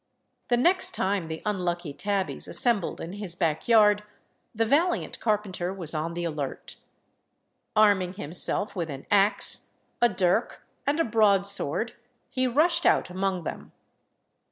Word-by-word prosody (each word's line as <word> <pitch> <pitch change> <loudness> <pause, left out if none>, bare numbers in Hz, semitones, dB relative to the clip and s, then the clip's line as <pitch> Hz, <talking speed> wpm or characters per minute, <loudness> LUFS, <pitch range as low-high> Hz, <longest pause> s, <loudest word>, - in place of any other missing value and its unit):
The 240 - +2
next 360 +9 +3
time 190 -3 -1
the 160 0 -7
unlucky 175 -6 -2
tabbies 200 +3 -2
assembled 230 -8 +2
in 170 - -7
his 200 -4 -3
back 165 -4 -1
yard, 210 -3 +5 0.5
the 225 +1 +1
valiant 320 +10 0
carpenter 200 -5 -1
was 175 -5 -2
on 165 +2 -3
the 175 - -3
alert. 150 -5 -5 1.0
Arming 200 -4 +3
himself 190 +4 -1
with 170 -3 -3
an 135 -2 -8
axe, 205 +1 +3 0.3
a 240 - +5
dirk, 185 -3 -1 0.2
and 295 +3 +1
a - - +4
broadsword, 200 -2 +1 0.4
he 255 0 0
rushed 340 +7 +2
out - - +2
among 185 -1 -2
them. - - -7
195 Hz, 135 wpm, -26 LUFS, 175-220 Hz, 1.0 s, yard